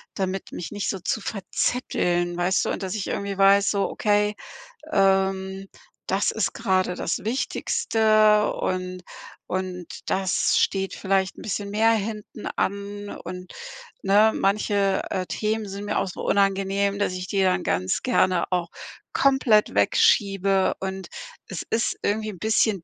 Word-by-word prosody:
damit 190 -1 -3
mich 170 - -6
nicht 205 -1 -3
so 195 - -2
zu 220 - -2
verzetteln, 180 -4 -1
weißt 175 +2 +1
du? - - -1
Und - - -4
dass 190 +2 -3
ich 205 - -3
irgendwie 200 -1 -3
weiß: 195 +1 +5
„So, 200 -1 0
okay, 210 0 +1 0.6
ähm, 190 0 +1 0.4
das 195 +2 +1
ist 220 - -1
gerade 185 -1 0
das 170 - -2
Wichtigste 215 - +2
und 185 0 -3 0.4
und 185 -1 -3 0.2
das 190 -1 +1
steht 195 -1 +1
vielleicht 190 -1 0
'n - - -10
bisschen 200 -1 -3
mehr 220 +2 +3
hinten 215 0 -4
an,“ 200 +1 -3
und, 180 0 -8 0.5
ne? 205 +3 +5
Manche, 200 -1 +1
äh, 185 -1 -1
Themen 215 0 -2
sind 200 +1 -6
mir 205 - -1
auch - - -1
so 180 - -7
unangenehm, 195 0 +1
dass 200 -2 0
ich 185 0 -5
die 195 0 +1
dann 185 0 +2
ganz 90 +2 0
gerne 185 -9 +2
auch 175 -2 0 0.4
komplett 265 -6 +3
wegschiebe 195 -2 +3
und 190 -1 -5 0.4
es 190 - -5
ist 230 +1 0
irgendwie 215 +1 -1
'n 185 - -12
bisschen 215 -2 +1
195 Hz, 145 wpm, -24 LUFS, 185-210 Hz, 0.6 s, weiß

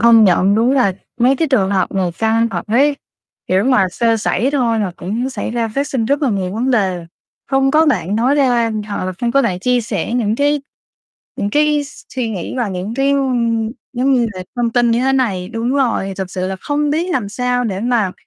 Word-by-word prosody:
Công 230 -1 +6
nhận, 190 +1 +3
đúng 230 +4 +3
là 250 -8 +3 0.3
mấy 255 +3 +3
cái 320 +3 0
trường 205 -8 +2
hợp 190 -2 0
này 185 -3 -1
căng 225 +1 +2
thật - - -4
đấy, 280 +6 +3 0.5
kiểu, 190 +2 +2
mà 250 -7 +3
sơ 230 +4 +1
sẩy 225 +3 0
thôi 240 -6 +1
là 195 -4 -2
cũng 225 +9 -3
xảy 260 - -4
ra 230 -1 -1
phát 275 +6 -2
sinh 255 -6 -1
rất 280 +6 0
là 270 - +2
nhiều 190 -3 -2
vấn 245 +4 0
đề, 185 -8 0 0.4
không 270 0 +2
có 315 +3 +4
bạn 205 - +1
nói 250 +5 +2
ra 245 -5 +2 0.2
hoặc 200 - -3
là 185 - -3
không 235 -1 0
có 275 - +4
bạn 190 -7 -1
chia 250 +5 +1
sẻ 220 -2 -3
những 220 -3 0
cái 290 +1 +1 0.8
những 200 - -2
cái 295 +2 +2
s 285 - -13
suy 250 -3 -2
nghĩ 190 -6 -5
và 240 -4 -1
những 190 +3 -4
cái, 270 +2 +1
ơ, 280 - +2 0.7
giống 265 +2 +1
như 240 -2 +2
là 185 - -6
thông 240 -1 0
tin 240 -1 +3
như 230 +1 +2
thế 265 +1 +2
này 200 -9 0
đúng 230 +2 -2
rồi, 235 -8 0
thực 190 -2 -4
sự 185 0 -3
là 190 - -4
không 295 0 -1
biết 335 +5 -1
làm 225 -6 -1
sao 245 +3 -1
để 195 -4 -2
mà 230 -5 +1
235 Hz, 230 wpm, -17 LUFS, 200-265 Hz, 0.8 s, Công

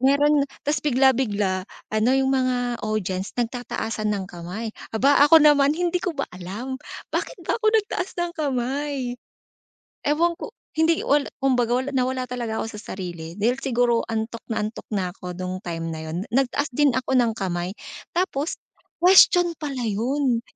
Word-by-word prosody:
meron 285 +2 +4 0.2
ta's 295 -1 0
bigla-bigla, 235 -9 +2 0.2
ano 215 +2 +2
'yung 270 0 +2
mga 250 -2 0
audience 195 -3 -3
nagtataasan 240 -2 -2
ng 190 - -4
kamay, 180 +6 -5 0.2
aba 280 +5 +4
ako 325 - +9
naman 295 -1 +5
hindi 355 +1 0
ko 350 -4 -3
ba 275 - 0
alam, 210 +9 -6 0.3
bakit - - -2
ba - - 0
ako 435 - +3
nagtaas 415 -4 0
ng 345 -1 -1
kamay. 275 -2 -2 0.9
Ewan 335 +3 +2
ko 445 - -7 0.2
hindi 320 +1 +2
wala 285 0 +2
kumbaga 250 -1 +1
na 265 -2 +1
nawala 255 0 -1
talaga 235 -3 -3
ako - - -2
sa 210 - -6
sarili, 175 -1 -7
dahil 235 +4 +2
siguro 245 -3 +2
antok 225 +1 -3
na 225 - 0
antok 215 - -8
na 185 -4 -2
ako 180 -2 -8
nung 185 +1 -4
time 165 -1 -4
na 160 - -6
'yun, 160 +1 -5 0.2
nagtaas 270 +2 +2
din 295 +1 +4
ako 260 +1 -2
ng 245 -3 +4
kamay, 180 -2 -2 0.4
tapos 340 -4 -1 0.4
question 355 -1 +6
pala 275 -6 -4
'yun. 240 +3 0
250 Hz, 160 wpm, -24 LUFS, 215-285 Hz, 0.9 s, ako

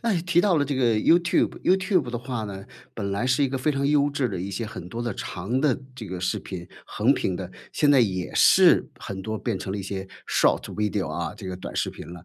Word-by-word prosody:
那 230 -2 +1
也 170 - +1
提 175 -1 +3
到 195 -5 +3
了 145 - +2
这 145 0 -2
个 120 -3 +2
YouTube。 170 +11 +3
YouTube 185 - +2
的 120 - -3
话 125 -2 -4
呢， 100 -2 -7 0.3
本 100 -3 -3
来 100 +5 -1
是 130 +2 +2
一 135 - +3
个 135 - -2
非 145 +4 +1
常 140 0 0
优 145 0 +3
质 140 -3 0
的 95 -4 -4
一 95 +3 -4
些 115 +3 -3
很 90 -4 -8
多 115 +4 -4
的 120 - -2
长 100 +9 -3
的 145 -5 +2 0.2
这 115 -4 -8
个 90 -1 -5
视 90 - 0
频， 90 -3 -7 0.2
横 - - +2
屏 95 - -1
的， 90 0 -6 0.2
现 145 - +3
在 140 - +6
也 95 -6 0
是， - - +6
很 95 -1 -6
多 110 +1 -3
变 - - -2
成 95 - -5
了 100 - -3
一 - - -4
些 95 0 -5 0.2
short - - +3
video 105 -2 -1
啊， - - -3
这 100 -3 -9
个 90 - -4
短 90 - -8
视 - - 0
频 - - -9
了， 90 -1 -10
120 Hz, 370 characters per minute, -25 LUFS, 95-145 Hz, 0.3 s, 在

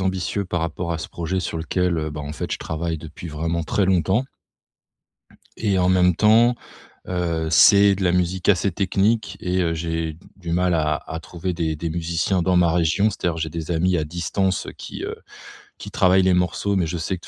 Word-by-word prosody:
ambitieux 95 +1 -1
par 90 -2 -2
rapport 85 +1 -3
à 80 - -3
ce - - -6
projet 90 +2 -3
sur 85 - -4
lequel, 90 +2 0
heu, 75 0 -3
bah 75 0 -6
en 75 0 -6
fait - - -5
je - - -2
travaille 80 0 -3
depuis 80 +2 -9
vraiment 80 +2 -2
très 95 +5 0
longtemps. 95 - +2 1.3
Et 100 -4 0
en 90 - +2
même 90 -1 +4
temps, 115 +3 +5 0.5
heu, 85 -3 -1
c'est 100 +4 +6
de 95 0 -3
la 90 - +3
musique 90 0 0
assez 100 0 +3
technique 100 +4 0
et 90 +1 -1
heu, 85 -1 0
j'ai 80 -1 -3 0.2
du 85 -4 -6
mal 90 +1 +2
à 75 -2 +1
à 80 +1 -7
trouver 90 +2 -5
des 80 -2 -2
des 80 +2 -4
musiciens 85 +2 -1
dans 90 +1 +2
ma 85 -2 +4
région. 90 +5 +2
C'est-à-dire, 85 -4 -2
j'ai 80 0 -3
des 80 +1 -5
amis 90 +2 +2
à 80 - -1
distance 90 +4 -1
qui, - - -7
heu, - - -5 0.6
qui - - -9
travaillent 95 +1 +4
les 95 0 +3
morceaux, 90 +3 0
mais 90 -4 +1
je 85 - -3
sais 85 +4 -2
que - - -19
de - - -13
85 Hz, 210 wpm, -22 LUFS, 80-95 Hz, 1.3 s, c'est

